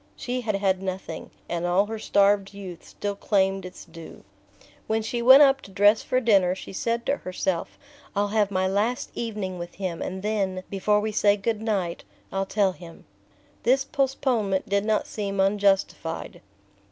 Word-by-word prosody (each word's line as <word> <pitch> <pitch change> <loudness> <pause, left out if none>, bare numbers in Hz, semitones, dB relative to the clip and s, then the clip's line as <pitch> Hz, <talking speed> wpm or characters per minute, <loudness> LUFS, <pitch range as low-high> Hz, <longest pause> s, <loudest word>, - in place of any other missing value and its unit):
She 250 0 -3
had 215 -4 -1
had 195 -1 +1
nothing, 185 -4 -5 0.2
and 170 0 -3
all 180 +3 +3
her 220 +1 -5
starved 200 -1 +2
youth 185 -4 -8
still 205 0 -4
claimed 195 -2 0
its 180 - -12
due. 165 -1 -12 0.6
When 220 0 0
she 235 +2 -2
went 260 +4 +9
up 270 -1 +4
to 195 - -13
dress 205 +3 +4
for 255 - 0
dinner 195 -7 +3
she 190 - -9
said 235 +4 -2
to 280 - +1
herself: 185 -1 -3 0.4
"I'll 205 0 +1
have 210 -1 +2
my 185 -1 0
last 210 +6 -1
evening 210 -6 -4
with 175 0 -7
him, 185 -4 -4
and 190 +1 -5
then, 195 -3 -1
before 210 +1 +2
we 215 +1 -2
say 205 -1 +3
good 210 +1 -2
night, 195 -6 -2 0.3
I'll 195 0 -2
tell 200 -2 +2
him." 170 -2 -13 0.6
This 265 +3 +2
postponement 260 -8 0
did 200 +1 +1
not 215 -1 +1
seem 200 -2 -4
unjustified. 195 -4 0
200 Hz, 170 wpm, -25 LUFS, 190-220 Hz, 0.6 s, went